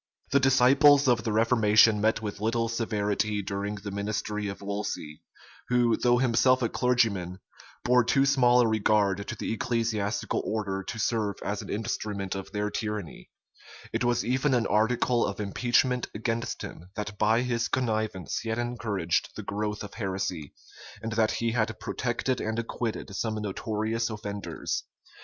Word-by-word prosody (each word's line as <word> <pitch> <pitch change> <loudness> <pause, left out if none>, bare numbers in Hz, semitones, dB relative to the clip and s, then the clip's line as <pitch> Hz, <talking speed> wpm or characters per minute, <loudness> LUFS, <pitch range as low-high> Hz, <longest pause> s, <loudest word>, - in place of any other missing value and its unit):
[*] - - -36
The 140 - +5
disciples 135 +2 +5
of 120 -2 +3
the 110 - -1
reformation 110 -1 +4
met 110 +1 +1
with 105 -1 -5
little 115 +1 +1
severity 105 -2 -1
during 100 +2 -3
the 100 0 -7
ministry 105 +1 -3
of 100 - -5
Wolsey, 100 -7 -5 0.5
who, 120 -2 +3
though 120 -1 +3
himself 130 +1 +3
a 115 - +1
clergyman, 110 -8 +1 0.5
bore 125 0 +4
too 135 +3 +3
small 125 -3 +5
a 120 - +3
regard 100 -2 +1
to - - -4
the - - -3
ecclesiastical 115 -2 -1
order 105 -3 -2
to 105 +4 -6
serve 105 -2 0
as 100 0 -2
an - - -10
instrument 100 -2 -3
of 95 -1 -6
their 105 0 -2
tyranny: 105 - -5 0.6
it - - 0
was 120 -1 +1
even 130 +3 +2
an 120 -2 +1
article 115 +3 +2
of 100 - -3
impeachment 120 +4 +1
against 115 +2 -2
him,[] 85 +3 -9
that 105 -1 -5
by 110 +3 +3
his 120 -2 0
connivance 110 - -1
he 115 - -5
had 110 - -1
encouraged 110 -8 -1
the - - -6
growth 105 0 -3
of 100 - -9
heresy, 95 -7 -4 0.5
and 115 - -3
that 110 0 +2
he 115 0 -1
had 110 -2 -1
protected 125 +2 -2
and 110 +1 -2
acquitted 115 -3 -4
some 110 +2 -1
notorious 110 +2 -2
offenders. 105 -2 -4
110 Hz, 160 wpm, -27 LUFS, 105-120 Hz, 0.6 s, The